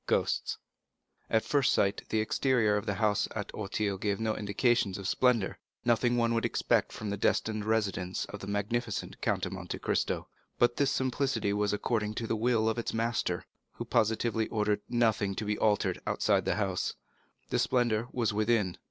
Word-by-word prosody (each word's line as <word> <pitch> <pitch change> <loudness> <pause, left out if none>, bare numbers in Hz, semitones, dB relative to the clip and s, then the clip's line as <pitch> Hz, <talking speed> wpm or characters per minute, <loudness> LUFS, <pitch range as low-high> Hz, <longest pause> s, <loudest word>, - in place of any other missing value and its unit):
Ghosts - - 0 0.7
At 110 - +2
first 140 -3 +3
sight, 100 0 +2
the 110 - +1
exterior 110 -2 +2
of 105 - -2
the 100 - 0
house 105 -2 +1
at - - -4
Auteuil 100 -1 -2
gave 100 -1 -1
no 110 -1 0
indications 105 0 +1
of 100 -2 -5
splendor, 120 -7 +2 0.3
nothing 120 +1 +3
one 115 -1 +2
would 115 - +1
expect - - +1
from 105 -1 -5
the 100 - -2
destined 110 +1 0
residence 100 -4 0
of 100 - -8
the 100 - -8
magnificent 105 +3 -2
Count - - 0
of - - -5
Monte - - -5
Cristo; - - -1 0.3
but 120 0 +3
this 140 -1 +3
simplicity 130 -6 0
was 105 0 +1
according 105 0 -1
to 115 - -3
the 115 - 0
will 110 0 +2
of 110 +1 0
its 115 - -3
master, 115 +1 -1 0.3
who - - -6
positively 110 +1 +1
ordered 105 -2 0
nothing 110 -5 +1
to 110 - -3
be 105 0 0
altered 105 -2 +1
outside. - - +2
The 95 -3 -3
splendor 120 -3 +1
was 115 -4 0
within. 105 -3 +1
110 Hz, 170 wpm, -30 LUFS, 105-120 Hz, 0.7 s, first